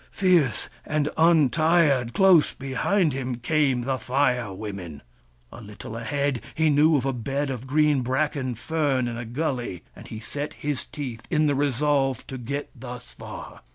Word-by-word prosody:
Fierce 175 Hz, -, +2 dB, 0.2 s
and 150 Hz, -1 st, 0 dB
untired, 155 Hz, -4 st, +3 dB
close 190 Hz, -5 st, +5 dB
behind 140 Hz, +6 st, 0 dB
him, 130 Hz, -2 st, -3 dB
came 135 Hz, 0 st, +1 dB
the 130 Hz, +1 st, -1 dB
Fire 125 Hz, -5 st, +1 dB
Women. 95 Hz, -7 st, -7 dB, 0.5 s
A -, -, -10 dB
little 105 Hz, +1 st, -9 dB
ahead, 140 Hz, +1 st, -1 dB
he 160 Hz, -1 st, +3 dB
knew 150 Hz, +2 st, +5 dB
of 130 Hz, -, -2 dB
a 135 Hz, -, 0 dB
bed 135 Hz, +4 st, -2 dB
of 130 Hz, 0 st, -6 dB
green 150 Hz, 0 st, +3 dB
bracken 130 Hz, 0 st, -1 dB
fern 140 Hz, -2 st, 0 dB
in 120 Hz, -, -4 dB
a 120 Hz, 0 st, -5 dB
gully, 120 Hz, -, -3 dB
and -, -, -12 dB
he 110 Hz, -, -7 dB
set 145 Hz, +6 st, -5 dB
his 145 Hz, -2 st, -3 dB
teeth 125 Hz, -6 st, -7 dB
in 155 Hz, -2 st, +2 dB
the 145 Hz, -, +3 dB
resolve 140 Hz, -1 st, +1 dB
to 130 Hz, -, -7 dB
get 140 Hz, +4 st, -4 dB
thus 125 Hz, -, -9 dB
far. -, -, -9 dB
135 Hz, 160 wpm, -25 LUFS, 120-150 Hz, 0.5 s, close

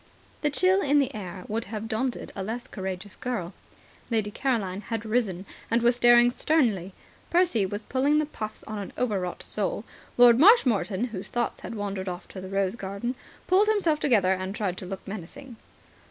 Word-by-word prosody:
The 295 Hz, -, +2 dB
chill 370 Hz, +6 st, +3 dB
in 290 Hz, -4 st, +3 dB
the 275 Hz, -1 st, +2 dB
air 185 Hz, -3 st, -7 dB
would 225 Hz, +2 st, -2 dB
have 215 Hz, +1 st, -5 dB
daunted 240 Hz, +3 st, -2 dB
a 195 Hz, -, -4 dB
less 230 Hz, +5 st, -4 dB
courageous 190 Hz, -3 st, -6 dB
girl. 205 Hz, -8 st, -4 dB, 0.6 s
Lady 220 Hz, -3 st, 0 dB
Caroline 210 Hz, -7 st, -1 dB
had 225 Hz, +1 st, -4 dB
risen, 215 Hz, -5 st, -1 dB, 0.2 s
and 230 Hz, +1 st, +2 dB
was 240 Hz, 0 st, +4 dB
staring 240 Hz, 0 st, +6 dB
sternly. 225 Hz, -, +1 dB, 0.4 s
Percy 340 Hz, -, +3 dB
was 205 Hz, +3 st, -5 dB
puffing 275 Hz, +3 st, +2 dB
the 305 Hz, -, +2 dB
puffs 215 Hz, -7 st, -6 dB
of 215 Hz, -, -6 dB
an 200 Hz, -, -7 dB
overwrought 195 Hz, -8 st, -2 dB
soul. 205 Hz, 0 st, -2 dB, 0.3 s
Lord 245 Hz, -1 st, +7 dB
Marshmoreton, 250 Hz, -, +4 dB
whose 195 Hz, -4 st, -6 dB
thoughts 240 Hz, 0 st, -2 dB
had -, -, -6 dB
wandered 200 Hz, -2 st, -3 dB
off 180 Hz, +1 st, -7 dB
to 190 Hz, -, -8 dB
the 185 Hz, -, -7 dB
rose 195 Hz, +1 st, 0 dB
garden, 200 Hz, +3 st, -4 dB, 0.3 s
pulled 390 Hz, +3 st, +4 dB
himself 370 Hz, -8 st, +2 dB
together 210 Hz, -11 st, +3 dB
and 185 Hz, +1 st, -4 dB
tried 195 Hz, -5 st, -1 dB
to 185 Hz, -, -6 dB
look 195 Hz, +1 st, -7 dB
menacing. 220 Hz, +6 st, -8 dB
220 Hz, 180 wpm, -26 LUFS, 195-250 Hz, 0.6 s, Lord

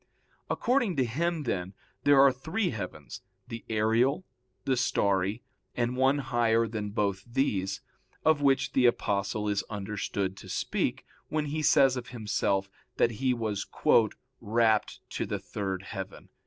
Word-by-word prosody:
According 245 Hz, -7 st, +1 dB
to 130 Hz, -3 st, +2 dB
him, 160 Hz, +7 st, -1 dB
then, 95 Hz, -6 st, -3 dB, 0.3 s
there 145 Hz, -1 st, +6 dB
are 135 Hz, 0 st, +7 dB
three 160 Hz, -, -2 dB
heavens, 90 Hz, -, -7 dB, 0.3 s
the 115 Hz, 0 st, -7 dB
aerial, 115 Hz, -, +2 dB, 0.4 s
the 135 Hz, -, +2 dB
starry, 100 Hz, -3 st, +1 dB, 0.3 s
and 120 Hz, +1 st, 0 dB
one 130 Hz, +2 st, +3 dB
higher 115 Hz, -4 st, +2 dB
than 105 Hz, -2 st, -4 dB
both 100 Hz, -1 st, -1 dB
these, 105 Hz, -6 st, -1 dB, 0.4 s
of 155 Hz, -2 st, +4 dB
which 135 Hz, -1 st, +2 dB
the 125 Hz, -2 st, +5 dB
Apostle 105 Hz, -2 st, 0 dB
is 100 Hz, -1 st, +1 dB
understood 100 Hz, -2 st, -3 dB
to -, -, -11 dB
speak -, -, -1 dB, 0.2 s
when 155 Hz, -1 st, -1 dB
he 150 Hz, +2 st, -2 dB
says 135 Hz, -3 st, +5 dB
of 120 Hz, -2 st, -5 dB
himself 105 Hz, -4 st, -1 dB, 0.3 s
that 120 Hz, -, +3 dB
he 130 Hz, -1 st, +3 dB
was 110 Hz, -5 st, -2 dB, 0.7 s
"rapt 110 Hz, -1 st, +1 dB
to -, -, -3 dB
the -, -, -2 dB
third 95 Hz, -2 st, -4 dB
heaven." -, -, -7 dB
115 Hz, 140 wpm, -29 LUFS, 105-135 Hz, 0.7 s, are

